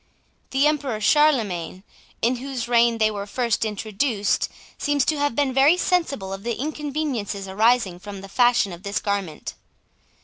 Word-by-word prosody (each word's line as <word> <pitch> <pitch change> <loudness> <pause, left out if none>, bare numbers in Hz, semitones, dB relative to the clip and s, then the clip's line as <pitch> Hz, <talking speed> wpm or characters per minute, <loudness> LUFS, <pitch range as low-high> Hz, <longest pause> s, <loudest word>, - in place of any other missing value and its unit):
The 270 +2 +2
Emperor 285 -7 0
Charlemagne, 215 - +2 0.4
in 245 +2 +2
whose 255 -2 -5
reign 235 -1 +3
they 215 -1 +2
were 200 -1 -5
first 235 +1 0
introduced, 215 +1 -1 0.3
seems 290 -2 +1
to 310 -2 0
have 290 -4 0
been 280 -3 +1
very 280 +6 +5
sensible 285 - 0
of 195 - -6
the 235 +2 -2
inconveniences 280 -9 -3
arising 210 -2 +2
from 200 0 -8
the 195 - -9
fashion 240 -2 +2
of 170 - -10
this 200 0 -2
garment. 200 -6 -3
235 Hz, 150 wpm, -23 LUFS, 200-275 Hz, 0.4 s, very